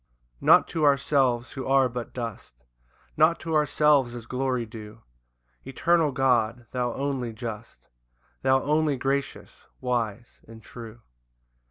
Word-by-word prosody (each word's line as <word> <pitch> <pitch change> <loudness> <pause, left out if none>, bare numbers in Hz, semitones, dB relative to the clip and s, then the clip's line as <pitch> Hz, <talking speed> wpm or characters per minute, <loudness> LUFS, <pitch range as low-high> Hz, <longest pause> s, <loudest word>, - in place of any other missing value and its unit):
1 - - -8
Not - - +7
to 160 - -2
ourselves, 135 -3 +2
who 130 - -6
are 135 -1 +4
but 120 -1 -6
dust, 115 - -7 0.6
Not 155 +2 +3
to 165 - -4
ourselves 150 -4 +3
is 120 -2 -8
glory 125 -1 -2
due, 110 0 -11 0.6
Eternal 160 +3 +1
God, 120 -3 +1
thou 125 -2 -1
only 135 -4 -3
just, 115 0 -8 0.5
Thou 130 0 +2
only 150 -1 +1
gracious, 135 +2 -4
wise, 120 -2 -3
and 110 0 -13
true. 115 0 -11
125 Hz, 130 wpm, -26 LUFS, 115-140 Hz, 0.6 s, Not